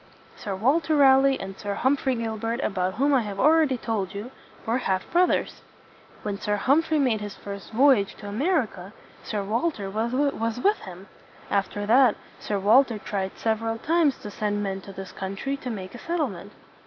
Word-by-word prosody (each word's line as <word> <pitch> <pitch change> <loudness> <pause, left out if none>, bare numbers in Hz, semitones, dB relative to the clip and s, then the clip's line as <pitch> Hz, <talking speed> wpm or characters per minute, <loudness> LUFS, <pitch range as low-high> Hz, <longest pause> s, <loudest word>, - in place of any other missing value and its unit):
Sir 200 -2 -5
Walter 295 - +2
Raleigh 270 -1 +5
and 195 0 -6
Sir 200 0 -4
Humphrey 265 0 +1
Gilbert 225 0 -3
about 185 -2 -1
whom 280 +4 +2
I 265 - +4
have 205 -3 -6
already 305 -2 +4
told 205 -5 -3
you, 215 +6 -6 0.3
were 230 +3 +1
half 190 -6 0
broth 360 +1 +4
ers. - - -1 0.6
When 205 -1 -3
Sir 210 - 0
Humphrey 300 +9 +2
made 250 -7 +1
his 205 -1 -6
first 200 -1 -8
voy 265 +3 +5
age 200 -1 -3
to 205 - -10
America, 220 - -1 0.3
Sir 210 -2 -3
Walter 215 -1 -2
was 230 +1 -1
with 410 +9 +2
him. 185 +1 -11 0.4
After 200 +1 -1
that, 240 +1 +5 0.2
Sir 205 - -2
Walter 225 +4 +4
tried 195 -2 -4
sev 220 -1 0
er 225 - -3
al 225 0 -1
times 315 +1 +2
to 210 - -6
send 205 0 -2
men 195 -1 -3
to 195 - -10
this 195 0 -8
country 195 +8 -4
to 255 - -6
make 190 -5 -6
a 240 - -9
set 340 +5 -3
tle 300 -6 +1
ment. 195 +1 -10
225 Hz, 190 wpm, -25 LUFS, 200-270 Hz, 0.6 s, Raleigh